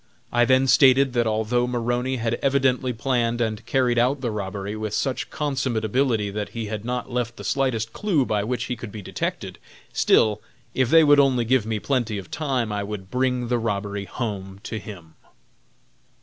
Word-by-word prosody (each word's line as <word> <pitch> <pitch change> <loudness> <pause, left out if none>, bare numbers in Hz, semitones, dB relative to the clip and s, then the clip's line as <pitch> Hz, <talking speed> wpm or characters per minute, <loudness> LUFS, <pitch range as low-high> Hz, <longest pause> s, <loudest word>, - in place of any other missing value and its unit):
I 120 0 +4
then 130 +2 +4
stated 135 0 +5
that 120 -2 +1
although 110 +3 +1
Maroney 125 +1 -1
had 115 -2 -1
evidently 130 -2 +2
planned 120 -1 0
and 110 -1 -1
carried 125 -2 +2
out 130 +4 +2
the 120 -3 -1
robbery 100 0 -4
with 110 -1 -3
such 125 0 -2
consummate 130 -6 -1
ability 110 -3 +1
that 105 +1 -4
he 115 - -2
had 105 0 -5
not 125 +1 -3
left 120 -1 -2
the - - -8
slightest 120 -5 -1
clue 170 -11 +1
by 105 -3 0
which 120 +3 -2
he 125 - -3
could 115 -2 -8
be 105 -1 -8
detected, - - -4 0.3
still, 105 -1 +3 0.3
if 130 -2 +1
they 165 +2 +7
would 145 -1 +6
only 130 -4 +3
give 120 -2 +2
me 110 -1 -1
plenty 115 -2 -1
of 95 - -8
time, 130 -8 -1
I 105 0 -2
would 100 -2 -6
bring 125 -1 0
the 120 0 +1
robbery 100 -2 -2
home 100 -4 -5
to 110 - -4
him. 90 -7 -11
120 Hz, 185 wpm, -24 LUFS, 105-130 Hz, 0.3 s, they